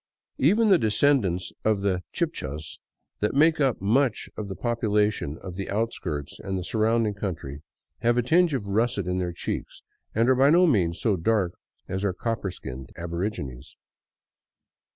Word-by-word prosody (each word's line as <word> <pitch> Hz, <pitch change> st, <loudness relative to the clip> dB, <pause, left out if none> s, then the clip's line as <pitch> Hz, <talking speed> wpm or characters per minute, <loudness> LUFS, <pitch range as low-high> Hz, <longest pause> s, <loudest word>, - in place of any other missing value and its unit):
Even 210 Hz, -, +4 dB
the 190 Hz, -3 st, +6 dB
descendants 105 Hz, -5 st, +2 dB
of 110 Hz, -2 st, +2 dB
the 95 Hz, -2 st, 0 dB
Chibchas, 80 Hz, -, -4 dB, 0.4 s
that 105 Hz, +5 st, 0 dB
make 155 Hz, +2 st, +4 dB
up 135 Hz, -4 st, +2 dB
much 115 Hz, +5 st, +1 dB
of 105 Hz, -, -5 dB
the 95 Hz, -, -5 dB
population 105 Hz, -, 0 dB
of 90 Hz, -, -6 dB
the 100 Hz, -, -4 dB
outskirts 95 Hz, -9 st, -3 dB
and 95 Hz, 0 st, -3 dB
the 90 Hz, -, -3 dB
surrounding 110 Hz, +1 st, +1 dB
country, 80 Hz, -8 st, -5 dB, 0.4 s
have 120 Hz, +1 st, +2 dB
a 120 Hz, -, +3 dB
tinge 165 Hz, +4 st, +3 dB
of 105 Hz, -6 st, -3 dB
russet 105 Hz, -1 st, +1 dB
in 90 Hz, +1 st, -1 dB
their 90 Hz, -1 st, -1 dB
cheeks, 85 Hz, -, -5 dB, 0.3 s
and 115 Hz, +2 st, +3 dB
are 130 Hz, -, +6 dB
by 135 Hz, +2 st, +5 dB
no 175 Hz, +4 st, +6 dB
means 90 Hz, -, +2 dB
so 110 Hz, -4 st, +2 dB
dark 95 Hz, 0 st, +1 dB, 0.4 s
as 95 Hz, +1 st, -3 dB
our 100 Hz, -2 st, +1 dB
copper 115 Hz, 0 st, -2 dB
skinned 65 Hz, -6 st, -8 dB
aborigines. 85 Hz, -, -5 dB
105 Hz, 160 wpm, -26 LUFS, 90-120 Hz, 0.4 s, the